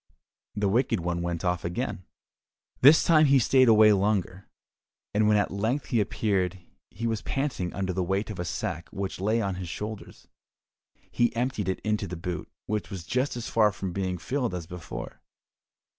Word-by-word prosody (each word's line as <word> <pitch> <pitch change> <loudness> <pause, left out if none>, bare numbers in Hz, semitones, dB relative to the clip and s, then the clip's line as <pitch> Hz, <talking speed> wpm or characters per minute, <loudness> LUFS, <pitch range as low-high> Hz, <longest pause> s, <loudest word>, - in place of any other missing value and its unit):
The 105 -1 +1
Wicked 120 +3 +2
One 85 0 -2
went 85 0 -3
off 90 -1 0
again. 90 +1 -3 0.7
This 145 +5 +7
time 155 -2 +5
he 140 0 +5
stayed 130 +1 +4
away 110 -1 +7
longer, 100 -2 -1 0.6
and 105 +1 +3
when 105 0 +4
at 105 - +1
length 110 +8 -1
he 120 -5 +2
appeared 95 -3 0 0.3
he 115 +5 -6
was 110 -2 -1
panting 135 -11 -2
under 95 -1 -2
the 95 - -1
weight 95 +4 -1
of 100 - -8
a 85 - -2
sack 85 +1 -4
which 95 -1 -5
lay 110 +3 +1
on 100 -1 -1
his 90 - -6
shoulders. 105 +3 -7 0.8
He 120 0 +1
emptied 120 -5 -1
it 95 - -1
into 105 -2 -1
the 90 - -5
boot, 85 +1 -5 0.2
which 105 -1 -3
was 95 -5 -7
just 125 - -1
as 120 - -5
far 110 -2 +3
from 95 -2 -5
being 95 -1 -2
filled 125 - -2
as 85 -2 -5
before. 85 -3 -8
100 Hz, 180 wpm, -27 LUFS, 90-115 Hz, 0.8 s, This